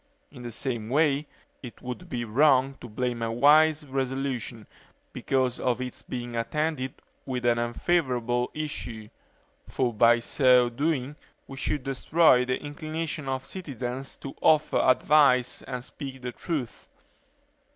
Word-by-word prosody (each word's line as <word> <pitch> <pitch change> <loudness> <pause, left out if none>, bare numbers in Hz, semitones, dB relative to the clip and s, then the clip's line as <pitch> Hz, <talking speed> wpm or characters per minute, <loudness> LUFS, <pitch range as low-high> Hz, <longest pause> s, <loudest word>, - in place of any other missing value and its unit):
In 125 - -12
the 120 - -6
same 115 -2 -3
way, 145 +1 +2 0.3
it 120 -3 -10
would 125 +8 -7
be 120 -6 -3
wrong 135 +3 +3
to 120 - -9
blame 120 +1 -2
a 115 0 -1
wise 150 +5 +5
resolution, 130 -4 -3 0.5
because 130 -2 0
if 125 -1 0
its 125 -1 -5
being 120 -1 -6
attended 130 +3 -2 0.3
with 125 -2 -4
an 120 -1 +3
unfavorable 125 -1 0
issue; 120 -8 -5 0.6
for 125 -3 0
by 120 +2 +5
so 125 0 +4
doing, 140 +2 -2 0.3
we 135 - -9
should 140 0 -2
destroy 135 0 +3
the 125 0 -1
inclination 155 +1 -5
of 130 0 -3
citizens 135 - -5
to 135 - -8
offer 155 -1 +3
advice 130 -1 +4
and 125 -1 -6
speak 130 -2 -8
the 125 - -3
truth. 140 - -5
130 Hz, 135 wpm, -27 LUFS, 120-145 Hz, 0.6 s, wise